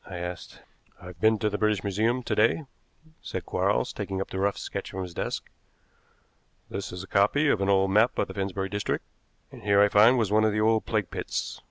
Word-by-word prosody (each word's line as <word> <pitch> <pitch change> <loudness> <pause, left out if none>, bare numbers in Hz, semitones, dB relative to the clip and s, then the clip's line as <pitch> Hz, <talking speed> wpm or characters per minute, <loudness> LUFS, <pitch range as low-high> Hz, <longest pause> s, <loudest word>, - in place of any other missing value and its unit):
I 90 - -6
asked. 90 0 -7 0.4
"I've 90 -1 -12
been 110 0 +4
to 105 - 0
the 105 - -3
British 105 -3 +1
Museum 110 +6 0
to 115 - -2
day," 115 +8 +2 0.6
said - - -5
Quarles, - - 0
taking 95 -1 -4
up 95 - -4
the 95 - -3
rough 100 +1 0
sketch - - -5
from 95 0 -5
his 90 -2 -8
desk. - - -4 1.2
"This 100 - -5
is 90 +1 -6
a - - -11
copy 105 +12 +3
of 105 - +2
an 100 - +1
old 95 -1 +3
map 110 +5 +3
of - - 0
the 95 - -8
Finsbury 95 0 -3
district, 100 -1 -2 0.5
and - - -12
here 100 0 +3
I 105 0 +6
find 110 +5 +6
was 110 -4 0
one 110 +1 +4
of 110 -1 +2
the 105 - 0
old 110 0 +2
plague 105 -4 -1
pits. - - -4
100 Hz, 220 wpm, -27 LUFS, 95-110 Hz, 1.2 s, I